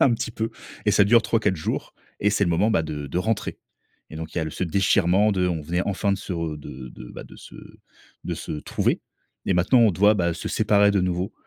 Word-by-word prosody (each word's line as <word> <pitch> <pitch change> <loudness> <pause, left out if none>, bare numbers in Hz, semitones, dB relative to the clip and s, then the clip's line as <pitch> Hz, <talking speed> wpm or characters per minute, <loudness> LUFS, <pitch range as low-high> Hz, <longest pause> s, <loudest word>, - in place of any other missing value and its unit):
Un 130 - +5
petit 115 - -3
peu, 110 0 -3 0.4
et - - +5
ça - - +5
dure 115 +3 +5
3-4 105 -6 +1
jours 80 - -4 0.3
et 105 - +3
c'est 105 0 +1
le 85 - 0
moment, 95 +7 +2
bah, 85 - +2
de 75 -2 -5
de 75 - -2
rentrer, 110 +3 -2 0.5
et 80 - -8
donc 80 0 -7
il - - -1
y - - +1
a - - -1
le 80 - -4
ce 90 - -3
déchirement 95 +3 +3
de 90 -2 +1
on 85 -3 -1
venait 85 +4 -1
enfin 100 +1 0
de 100 - -1
se 95 - -6
de 75 -6 -5
de, - - -11
bah, - - -8
de - - -14
se - - -14 0.7
de - - -2
se - - -6
trouver, 75 - -1 0.5
et 95 - +2
maintenant 90 +8 +4
on 115 -2 +6
doit, 105 +4 +4
bah, 85 -4 0
se 80 - -5
séparer 105 -1 +3
de 100 -1 +2
nouveau, 90 +1 -1
90 Hz, 245 wpm, -24 LUFS, 85-105 Hz, 0.7 s, on